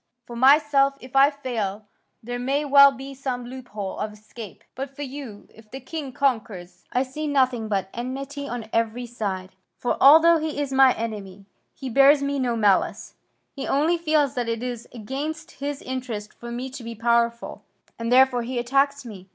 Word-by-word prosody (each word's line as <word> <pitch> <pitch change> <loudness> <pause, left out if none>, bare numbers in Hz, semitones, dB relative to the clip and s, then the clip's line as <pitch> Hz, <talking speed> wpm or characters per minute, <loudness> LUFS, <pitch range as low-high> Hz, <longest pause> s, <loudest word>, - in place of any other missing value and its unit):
For 235 - -9
myself, 275 +1 +4
if 255 +1 -13
I 275 +1 +7
fail, 225 -8 -4 0.4
there 245 +2 -4
may 275 +4 0
well 280 0 +8
be 275 +1 -9
some 255 -2 -4
loophole 240 -6 -7
of 210 0 -3
escape. 215 0 -11
But 270 +1 -6
for 290 - -5
you, 265 -6 -8
if 220 -1 -18
the 265 - -7
king 275 +1 -6
conquers, 210 -10 -2
I 250 - +1
see 300 +4 -5
nothing 260 -5 +1
but 195 -3 -1
enmity 275 +4 -5
on 240 -2 -5
every 230 +2 0
side. 195 -6 -4 0.3
For, 245 - -1
although 325 +4 +8
he 310 -1 -3
is 280 -2 -2
my 265 -1 +6
enemy, 205 -4 -6 0.3
he 270 - -7
bears 275 +3 +5
me 280 0 -1
no 245 -2 0
malice, 205 -4 +1 0.4
he 275 - -5
only 320 +5 +2
feels 305 -4 +1
that 240 -2 -2
it 230 +1 -3
is 245 -2 -5
against 295 +8 -5
his 285 0 -5
interest 245 -5 -5
for 235 - -10
me 250 +2 -5
to 260 -2 -8
be 230 0 -7
powerful 235 +1 0 0.4
and 230 +1 -3
therefore 255 -1 +5
he 245 +2 -4
attacks 275 +3 +1
me. 195 -5 -10
255 Hz, 180 wpm, -24 LUFS, 230-275 Hz, 0.4 s, well